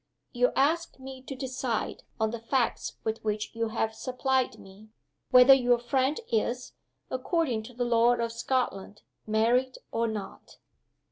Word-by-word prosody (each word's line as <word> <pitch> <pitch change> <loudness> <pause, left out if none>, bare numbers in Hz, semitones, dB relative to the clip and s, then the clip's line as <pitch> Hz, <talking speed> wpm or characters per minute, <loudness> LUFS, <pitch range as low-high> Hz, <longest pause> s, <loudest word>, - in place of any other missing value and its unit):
You 250 0 +2
ask 320 +4 +1
me 265 0 -9
to 270 - -5
decide 255 -3 -3 0.2
on 220 0 +1
the 235 - -5
facts 235 +2 -1
with 220 +1 -3
which 215 0 -2
you 230 0 -1
have 220 0 -1
supplied 260 +2 -1
me 195 +3 -15 0.4
whether 250 +1 +9
your 245 -2 +4
friend 260 +4 0
is, 240 +3 -1 0.4
according 255 -3 0
to 250 - -16
the 245 0 -1
law 240 0 +4
of 235 -1 -2
Scotland, 230 -5 -2 0.2
married 240 +4 +2 0.2
or 230 0 0
not?" 215 -3 -7
245 Hz, 145 wpm, -28 LUFS, 225-260 Hz, 0.4 s, whether